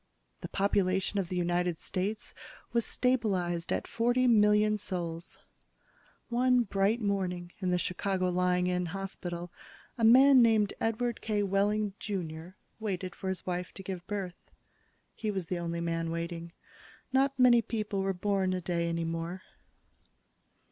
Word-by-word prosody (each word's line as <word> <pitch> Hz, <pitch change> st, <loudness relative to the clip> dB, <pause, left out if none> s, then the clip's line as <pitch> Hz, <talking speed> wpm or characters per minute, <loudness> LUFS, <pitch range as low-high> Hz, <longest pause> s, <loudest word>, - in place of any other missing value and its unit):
The -, -, -6 dB
population 195 Hz, 0 st, +1 dB
of 180 Hz, -3 st, -2 dB
the 185 Hz, -, -3 dB
United 175 Hz, -1 st, 0 dB
States 200 Hz, +7 st, -3 dB, 0.4 s
was 235 Hz, -1 st, +2 dB
stabilized 190 Hz, -9 st, 0 dB
at -, -, 0 dB
forty 245 Hz, +2 st, +1 dB
million 210 Hz, -2 st, +4 dB
souls. 170 Hz, -3 st, -3 dB, 0.9 s
One 250 Hz, +1 st, +3 dB
bright 200 Hz, +2 st, +1 dB
morning 185 Hz, -4 st, -2 dB
in 185 Hz, -2 st, -1 dB
the 180 Hz, -, +2 dB
Chicago 185 Hz, +1 st, -1 dB
Lying 180 Hz, 0 st, +1 dB
in 180 Hz, -1 st, 0 dB
Hospital, 175 Hz, -1 st, -5 dB, 0.5 s
a -, -, 0 dB
man 260 Hz, +3 st, +8 dB
named 220 Hz, -3 st, +4 dB
Edward 230 Hz, +1 st, -1 dB
K. 210 Hz, -2 st, 0 dB
Wehling, 205 Hz, +1 st, +1 dB
Jr., 175 Hz, -3 st, -5 dB, 0.2 s
waited 190 Hz, -4 st, -3 dB
for 190 Hz, -, -7 dB
his 190 Hz, -2 st, -3 dB
wife 180 Hz, 0 st, -3 dB
to 195 Hz, -, -9 dB
give 185 Hz, -1 st, -6 dB
birth. 195 Hz, -4 st, -5 dB, 0.6 s
He 215 Hz, -, -3 dB
was 190 Hz, -4 st, -2 dB
the 175 Hz, +1 st, -3 dB
only 170 Hz, 0 st, -3 dB
man 165 Hz, -1 st, -1 dB
waiting. 170 Hz, 0 st, -4 dB, 0.6 s
Not 270 Hz, +1 st, +2 dB
many 245 Hz, -2 st, +6 dB
people 210 Hz, -3 st, -2 dB
were 195 Hz, 0 st, 0 dB
born 190 Hz, 0 st, 0 dB
a 185 Hz, -, -2 dB
day 170 Hz, -1 st, -1 dB
any 170 Hz, 0 st, -1 dB
more. 165 Hz, +3 st, -4 dB
190 Hz, 145 wpm, -30 LUFS, 175-215 Hz, 0.9 s, man